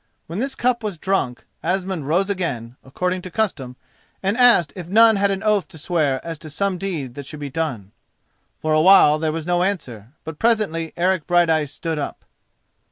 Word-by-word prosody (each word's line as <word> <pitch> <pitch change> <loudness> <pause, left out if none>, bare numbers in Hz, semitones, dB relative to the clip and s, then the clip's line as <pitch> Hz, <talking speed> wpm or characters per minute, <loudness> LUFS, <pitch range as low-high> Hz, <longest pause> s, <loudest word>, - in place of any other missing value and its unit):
When 170 +5 -5
this 265 +2 -2
cup 245 -1 +1
was 205 -5 -3
drunk, 155 -9 -1 0.2
Asmund 180 -3 -2
rose 175 +6 +2
again, 140 - -3
according 180 +7 -2
to 185 - -8
custom, 165 - -2 0.5
and 195 +2 +1
asked 235 - +5
if 180 -3 -7
none 220 +3 +5
had 200 0 +2
an 195 +1 -2
oath 210 -3 +2
to 180 - -14
swear 155 -5 0
as 165 -2 -6
to 155 - -10
some 185 +4 -1
deed 160 -11 -4
that 140 +1 -8
should 150 - -8
be 145 -2 -6
done. 130 -11 -3 0.7
For 155 0 -1
a 155 - +4
while 155 -4 +6
there 155 0 0
was 160 0 -4
no 175 0 +1
answer, 130 - -3
but 160 -1 -8
presently 205 -9 +1
Eric 180 -2 +1
Brighteyes 165 -5 +2
stood 165 -3 -4
up. 145 - -6
170 Hz, 190 wpm, -21 LUFS, 150-195 Hz, 0.7 s, while